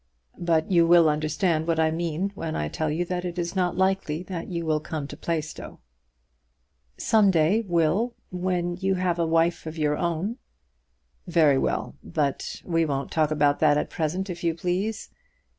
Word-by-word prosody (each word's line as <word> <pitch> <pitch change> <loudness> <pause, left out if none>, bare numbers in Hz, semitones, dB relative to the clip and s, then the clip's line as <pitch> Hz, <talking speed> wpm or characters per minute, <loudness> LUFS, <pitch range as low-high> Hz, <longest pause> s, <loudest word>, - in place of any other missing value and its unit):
But 165 0 +1
you 170 -2 +5
will 170 -1 +6
understand 155 +2 0
what 165 -1 +1
I 160 0 +3
mean 170 +3 -2
when 165 -5 -4
I 75 0 -2
tell 155 - -2
you 165 +4 -1
that 180 0 -3
it 175 -1 -5
is 170 +1 -3
not 180 -2 0
likely 190 -4 0
that 180 -3 -6
you 170 -2 -3
will 155 -1 +1
come 155 -1 -5
to 145 - -8
Plaistow." 155 -1 -4 1.2
"Some 215 -3 +4
day, 175 +5 +3
Will, 175 +8 +1 0.2
when 180 -1 -1
you 190 +1 0
have 180 -2 0
a 165 - +1
wife 165 0 +1
of 160 +1 -6
your 150 -1 +1
own 175 +7 -2 0.5
" - - -47 0.2
"Very 155 -6 +4
well; - - -1
but 140 - -2
we 165 -2 +1
won't 140 -3 -2
talk 155 -2 +2
about 145 -2 +2
that 150 -2 +4
at - - -2
present, 175 +5 -2
if 175 -2 -6
you 165 -1 +1
please. 190 +6 -2
170 Hz, 180 wpm, -25 LUFS, 155-180 Hz, 1.2 s, will